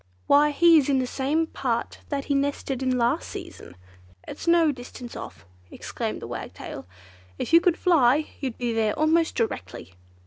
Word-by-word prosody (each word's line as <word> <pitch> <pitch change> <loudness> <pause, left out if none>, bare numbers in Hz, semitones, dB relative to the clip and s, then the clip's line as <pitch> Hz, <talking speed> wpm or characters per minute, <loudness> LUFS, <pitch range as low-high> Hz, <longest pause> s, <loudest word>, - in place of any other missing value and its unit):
"Why 290 +1 +5
he 330 +2 +6
is 285 - -1
in 275 - +3
the 260 - +1
same 285 +6 0
part 250 -7 -3
that 280 -2 -3
he 285 - 0
nested 275 -1 -1
in 255 -1 +1
last 235 0 0
season. 90 - -9 0.5
It's - - -8
no 335 -2 +5
distance 245 -2 -10
off," 85 - -9 0.2
exclaimed - - -5
the - - -6
Wagtail. - - -8 0.5
"If - - -4
you 335 - +8
could 355 -1 +2
fly, 300 -4 +3
you'd 260 -4 -4
be 240 -2 -2
there 220 -2 0
almost 320 +2 +2
directly!" 95 - -4
275 Hz, 170 wpm, -25 LUFS, 245-315 Hz, 0.5 s, you